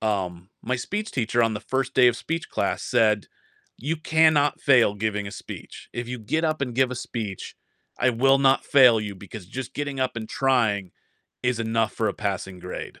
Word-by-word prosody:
Um, 95 Hz, -4 st, -2 dB
my 130 Hz, +3 st, -1 dB
speech 210 Hz, -, -4 dB
teacher 120 Hz, -1 st, +1 dB
on 115 Hz, -1 st, +2 dB
the 105 Hz, -, -4 dB
1st 130 Hz, +1 st, -2 dB
day 125 Hz, -1 st, +5 dB
of 120 Hz, -, 0 dB
speech 165 Hz, +6 st, -4 dB
class -, -, -1 dB
said, 105 Hz, -3 st, +2 dB, 0.5 s
"You 155 Hz, +6 st, -2 dB
cannot 155 Hz, -2 st, +3 dB
fail 120 Hz, -7 st, +4 dB
giving 105 Hz, -1 st, -2 dB
a -, -, -6 dB
speech. -, -, -10 dB
If 120 Hz, 0 st, -5 dB
you 125 Hz, 0 st, -4 dB
get 155 Hz, +10 st, -1 dB
up 155 Hz, -2 st, 0 dB
and 125 Hz, -3 st, -3 dB
give 130 Hz, 0 st, +2 dB
a -, -, -3 dB
speech, 110 Hz, -5 st, -6 dB, 0.4 s
I 120 Hz, -, +4 dB
will 135 Hz, +3 st, +4 dB
not 135 Hz, 0 st, +3 dB
fail 125 Hz, -5 st, +6 dB
you 105 Hz, -2 st, -4 dB
because 100 Hz, +1 st, -10 dB
just 130 Hz, +7 st, -7 dB
getting 145 Hz, -2 st, -3 dB
up 130 Hz, -2 st, -1 dB
and 110 Hz, -1 st, -4 dB
trying 110 Hz, -9 st, +1 dB, 0.5 s
is 125 Hz, -2 st, 0 dB
enough 115 Hz, -1 st, 0 dB
for 110 Hz, -, 0 dB
a 100 Hz, -, -3 dB
passing 95 Hz, -2 st, -3 dB
grade." 90 Hz, +1 st, -7 dB
120 Hz, 200 wpm, -25 LUFS, 105-135 Hz, 0.5 s, fail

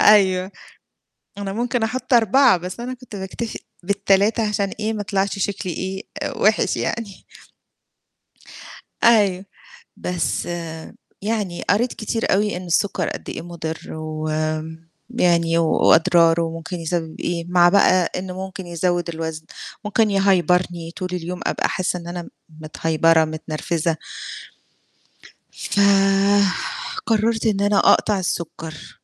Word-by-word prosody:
أيوه. 190 Hz, -3 st, +5 dB, 0.9 s
أنا 195 Hz, -1 st, -4 dB
ممكن 240 Hz, +1 st, -1 dB
أحُط 255 Hz, +3 st, -2 dB
4 240 Hz, 0 st, +5 dB
بس 180 Hz, +5 st, -7 dB
أنا 250 Hz, +2 st, -4 dB
كنت 250 Hz, -4 st, -11 dB
باكتفي 195 Hz, +4 st, -5 dB, 0.2 s
بال3 200 Hz, +3 st, +2 dB
عشان 200 Hz, -1 st, 0 dB
إيه 215 Hz, +1 st, -1 dB
ما 210 Hz, -, -3 dB
يطلعش 200 Hz, 0 st, 0 dB
شكلي 190 Hz, -2 st, -2 dB
إيه 190 Hz, +3 st, -4 dB, 0.2 s
آآ 270 Hz, -5 st, -4 dB
وِحش 215 Hz, 0 st, +2 dB
يعني. 225 Hz, -5 st, -4 dB, 1.8 s
أيوه. 200 Hz, -5 st, +4 dB, 0.5 s
بس 170 Hz, -7 st, -2 dB, 0.8 s
يعني 205 Hz, -4 st, -2 dB
قريت 235 Hz, +5 st, +2 dB
كتير 225 Hz, 0 st, -1 dB
أوي 205 Hz, -1 st, +1 dB
إن 180 Hz, -, -7 dB
السُكّر 185 Hz, +4 st, 0 dB
قد -, -, -7 dB
إيه -, -, -5 dB
مُضِر 165 Hz, -1 st, -5 dB, 0.2 s
وم 155 Hz, +1 st, -3 dB, 0.3 s
يعني 170 Hz, -1 st, +3 dB
و 165 Hz, -, +3 dB
وأضراره 165 Hz, 0 st, +5 dB
وممكن 165 Hz, +2 st, -5 dB
يسَبب 165 Hz, -1 st, -3 dB
إيه، 170 Hz, -1 st, -2 dB
مع 175 Hz, -1 st, +5 dB
بقى 185 Hz, -2 st, +4 dB
إنه 185 Hz, 0 st, -4 dB
ممكن 190 Hz, -1 st, -8 dB
يزوّد 175 Hz, 0 st, -1 dB
الوزن، 160 Hz, -1 st, -5 dB, 0.4 s
ممكن 215 Hz, +1 st, +2 dB
يهيبرني 180 Hz, -3 st, +2 dB
طول 180 Hz, -1 st, -3 dB
اليوم 180 Hz, +1 st, -4 dB
أبقى -, -, 0 dB
حاسّة 180 Hz, -1 st, -1 dB
إن 170 Hz, -, -10 dB
أنا 175 Hz, 0 st, -4 dB
م -, -, -12 dB, 0.3 s
متهيبرة، 160 Hz, +1 st, +2 dB
متنرفزة. 155 Hz, +1 st, -2 dB, 1.5 s
ف -, -, -3 dB, 1.3 s
قرّرت 225 Hz, 0 st, +1 dB
إن 200 Hz, -3 st, +1 dB
أنا 205 Hz, 0 st, +3 dB
أقطع 210 Hz, -2 st, +4 dB
السُكّر. 165 Hz, -3 st, -5 dB
185 Hz, 125 wpm, -21 LUFS, 165-205 Hz, 1.8 s, أيوه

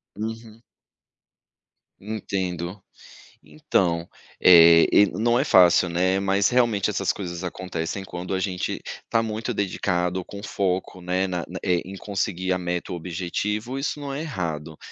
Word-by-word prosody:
Uhum. 115 Hz, +1 st, -7 dB, 1.4 s
Entendo. 95 Hz, -3 st, -4 dB, 0.6 s
Então, 85 Hz, +3 st, 0 dB, 0.3 s
eh, 85 Hz, -2 st, +8 dB
e 105 Hz, -, +7 dB
não 120 Hz, +5 st, +1 dB
é -, -, +2 dB
fácil, 90 Hz, -1 st, +5 dB
né, 95 Hz, +3 st, +1 dB
mas 100 Hz, +1 st, +2 dB
realmente 115 Hz, -5 st, +2 dB
essas 100 Hz, -1 st, 0 dB
coisas 85 Hz, -2 st, -6 dB
acontecem 90 Hz, +1 st, -4 dB
quando 90 Hz, +2 st, -6 dB
a 95 Hz, -, 0 dB
gente 95 Hz, -2 st, -3 dB, 0.2 s
está 115 Hz, -, +1 dB
muito 115 Hz, +2 st, -3 dB
dedicado, 90 Hz, -2 st, -1 dB
com 100 Hz, +2 st, -9 dB
foco, 95 Hz, -2 st, -2 dB
né, 90 Hz, +2 st, 0 dB
na, 90 Hz, -2 st, -3 dB, 0.2 s
eh, 90 Hz, -2 st, +1 dB
em 95 Hz, +1 st, -8 dB
conseguir 95 Hz, -2 st, -2 dB
a -, -, 0 dB
meta 90 Hz, -1 st, -3 dB
ou -, -, -3 dB
objetivos, 105 Hz, -, -3 dB
isso 150 Hz, -, -4 dB
não 140 Hz, -1 st, -5 dB
é 145 Hz, -, -3 dB
errado. 80 Hz, -, -4 dB
95 Hz, 140 wpm, -24 LUFS, 90-105 Hz, 1.4 s, eh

